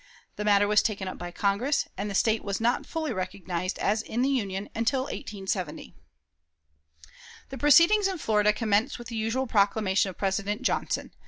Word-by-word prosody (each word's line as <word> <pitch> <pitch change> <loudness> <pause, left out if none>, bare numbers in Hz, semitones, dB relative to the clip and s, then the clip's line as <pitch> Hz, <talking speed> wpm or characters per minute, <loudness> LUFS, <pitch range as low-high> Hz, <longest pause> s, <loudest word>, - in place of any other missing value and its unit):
The 210 - -4
matter 205 -1 +4
was 210 0 +4
taken 200 -3 -2
up 185 - -6
by 175 - -5
Congress, 205 +10 0
and 200 +2 -4
the 200 - -4
State 220 +1 +2
was 200 -1 -3
not 235 +2 0
fully 315 -5 -3
recognized 185 -1 -4
as 215 +2 0
in 235 +2 -2
the 270 - +2
Union 200 -7 -2
until 230 +4 0
1870. 195 - -5 1.6
The 270 - -7
proceedings 335 +8 +6
in 380 -2 -3
Florida 210 -7 +2
commenced 215 +4 0
with 240 -1 -9
the 230 - -6
usual 225 +4 -1
proclamation 200 -3 +2
of 185 - -10
President 200 +1 -1
Johnson. - - -1
210 Hz, 170 wpm, -27 LUFS, 195-245 Hz, 1.6 s, proceedings